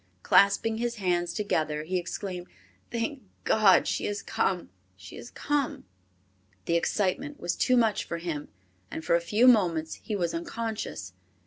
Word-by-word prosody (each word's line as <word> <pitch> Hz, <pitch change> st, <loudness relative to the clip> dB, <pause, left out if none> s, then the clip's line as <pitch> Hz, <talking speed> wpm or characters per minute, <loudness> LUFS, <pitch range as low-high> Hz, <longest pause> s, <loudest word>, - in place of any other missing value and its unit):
Clasping 220 Hz, +3 st, +4 dB
his 240 Hz, 0 st, -1 dB
hands 175 Hz, -4 st, 0 dB
together, 155 Hz, -7 st, -1 dB
he 180 Hz, +3 st, -1 dB
exclaimed, 180 Hz, +1 st, -5 dB, 0.4 s
"Thank 235 Hz, +4 st, -3 dB, 0.2 s
God 210 Hz, -3 st, +5 dB
she -, -, -1 dB
has 205 Hz, 0 st, -3 dB
come! 180 Hz, -, -1 dB, 0.2 s
She 95 Hz, +1 st, -12 dB
has 240 Hz, -, -9 dB
come!" 290 Hz, -, -2 dB, 0.8 s
The -, -, 0 dB
excitement 205 Hz, +11 st, 0 dB
was 175 Hz, 0 st, -1 dB
too 255 Hz, -, +3 dB
much 225 Hz, -3 st, +2 dB
for 170 Hz, -, -4 dB
him 165 Hz, -4 st, -4 dB, 0.4 s
and 160 Hz, -, -6 dB
for -, -, +2 dB
a 170 Hz, -, +2 dB
few 215 Hz, +8 st, +3 dB
moments 170 Hz, -9 st, +3 dB
he 215 Hz, -, -3 dB
was 175 Hz, -4 st, -1 dB
unconscious. 170 Hz, -, -4 dB
190 Hz, 150 wpm, -28 LUFS, 170-225 Hz, 0.8 s, God